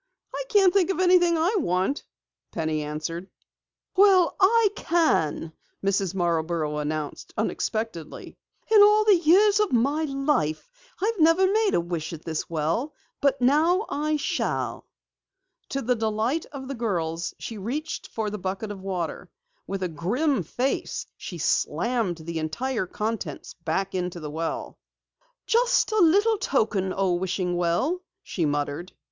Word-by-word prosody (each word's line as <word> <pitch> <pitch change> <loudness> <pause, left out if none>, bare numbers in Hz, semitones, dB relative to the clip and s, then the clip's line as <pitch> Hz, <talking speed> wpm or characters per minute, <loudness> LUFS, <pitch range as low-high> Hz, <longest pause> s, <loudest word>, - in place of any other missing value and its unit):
"I - - -3
can't 390 -4 +5
think 385 -3 +3
of 385 - -1
anything 355 -2 +4
I 355 +7 +2
want," 185 - 0 0.5
Penny 160 -2 -1
answered. 155 +5 -5 0.7
"Well, 380 -3 +5
I 425 +3 +5
can!" 165 - +1 0.3
Mrs. 195 -2 0
Marborough 165 -3 0
announced 150 0 -4
unexpectedly. 220 -5 -3 0.4
"In 430 -2 +8
all 420 +1 +6
the 420 -2 +7
years 395 +6 +5
of 420 -2 +1
my 280 +6 +2
life 275 - -1 0.3
I've 440 -1 0
never 330 +4 +5
made 420 +2 +2
a - - +3
wish 170 -2 -4
at 160 - -9
this 160 -2 -3
well, 170 - -1 0.3
but 275 -1 +2
now 320 - +3
I 305 +1 0
shall!" 290 - -2 0.8
To 275 - -2
the 250 +2 +2
delight 225 +6 -1
of 270 -2 -8
the 275 - -4
girls, 175 -8 -2
she 225 -2 -7
reached 295 +10 -4
for 215 -2 -3
the 210 - -5
bucket 195 +3 -4
of 195 -2 -8
water. 185 -4 -4 0.4
With 195 -1 -3
a - - +1
grim 210 - 0
face 250 - -2
she - - -8
slammed 230 -8 0
the 165 0 -5
entire 215 +8 -2
contents 210 -8 -4
back 170 +3 -2
into 180 -1 -3
the 150 -2 -6
well. 165 +2 -4 0.7
"Just 485 0 +2
a 435 - +2
little 405 +5 +4
token, 210 - 0
O 190 -1 +1
wishing 180 0 -1
well," 175 - 0 0.2
she 165 -5 -1
muttered. 145 +4 -3
220 Hz, 145 wpm, -25 LUFS, -, 0.8 s, In